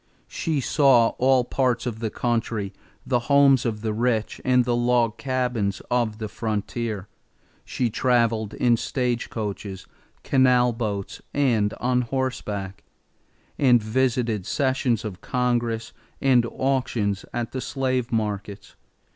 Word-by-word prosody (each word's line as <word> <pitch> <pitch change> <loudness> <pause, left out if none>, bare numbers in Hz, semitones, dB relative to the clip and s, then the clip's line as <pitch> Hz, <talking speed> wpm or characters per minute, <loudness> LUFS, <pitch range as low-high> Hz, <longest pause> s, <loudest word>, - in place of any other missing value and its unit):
She 155 -4 -2
saw 130 -4 +4
all 130 0 +4
parts 125 0 0
of 115 -3 -4
the 110 -1 -2
country, 115 -4 -2 0.3
the 125 -1 +1
homes 140 -3 +5
of 105 -2 -3
the 110 -1 -1
rich 115 -1 -1
and 125 -1 +3
the 120 -1 +1
log 120 -2 +1
cabins 125 -7 -1
of 120 -3 +1
the 110 -1 -4
frontier; 110 -1 -3 0.6
she 120 -3 -2
traveled 115 -3 +1
in 120 -2 +3
stagecoaches, 110 -6 -3 0.4
canal 125 -2 +3
boats, 105 -4 -4
and 115 -8 +2
on 125 0 +1
horseback; 110 -7 -3 0.8
and 125 -3 +5
visited 115 -3 0
sessions 130 -5 0
of 95 -4 -6
Congress 120 -2 -1 0.3
and 125 -3 +3
auctions 125 -7 -1
at 120 -1 -4
slave 130 -3 -1
markets. 105 -3 -3
120 Hz, 120 wpm, -24 LUFS, 110-125 Hz, 0.8 s, homes